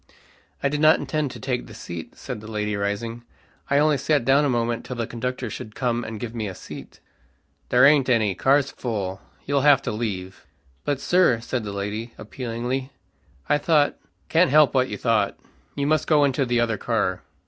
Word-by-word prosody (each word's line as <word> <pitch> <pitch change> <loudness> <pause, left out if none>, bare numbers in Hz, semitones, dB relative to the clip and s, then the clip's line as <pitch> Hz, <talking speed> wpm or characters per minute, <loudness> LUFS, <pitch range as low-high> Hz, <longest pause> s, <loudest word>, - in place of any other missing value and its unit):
"I - - +4
did 145 +1 -1
not 155 +1 +6
intend 155 -2 -2
to - - -9
take 125 -2 -3
the - - -11
seat," 85 -1 -8
said 105 - -6
the 110 - -10
lady 105 -1 -2
rising, 105 +4 -3 0.5
"I 140 - +3
only 150 -1 +3
sat 140 -2 +1
down 135 +2 +4
a 145 - +2
moment 120 -1 0
till 125 - -6
the 120 -1 -2
conductor 125 +2 -4
should 110 - -8
come 120 -2 -1
and 110 -1 -6
give 115 0 -5
me 110 -3 -3
a 95 - -6
seat." - - -10 0.7
"There 125 +2 +6
aint 140 -2 +5
any. 110 -5 +3
Car's 135 +7 +2
full. 100 -6 -4 0.2
You'll 140 0 +1
have 140 -1 +5
to 125 - -2
leave." 95 -7 -5 0.4
"But, 140 -2 0
sir," 175 -8 +3
said 120 +1 -3
the 105 - -5
lady, 105 +4 -4
appealingly, 125 +3 -4 0.6
"I 145 - +3
thought 150 -1 +3 0.2
" - - -42
"Can't 165 +1 +4
help 150 +1 +5
what 130 -1 +2
you - - -4
thought 110 -4 +1 0.4
you 140 - -1
must 155 +1 +1
go 150 -2 +4
into 135 -1 +1
the 120 0 +1
other 115 -3 0
car." 100 -6 -1
120 Hz, 200 wpm, -24 LUFS, 110-140 Hz, 0.7 s, not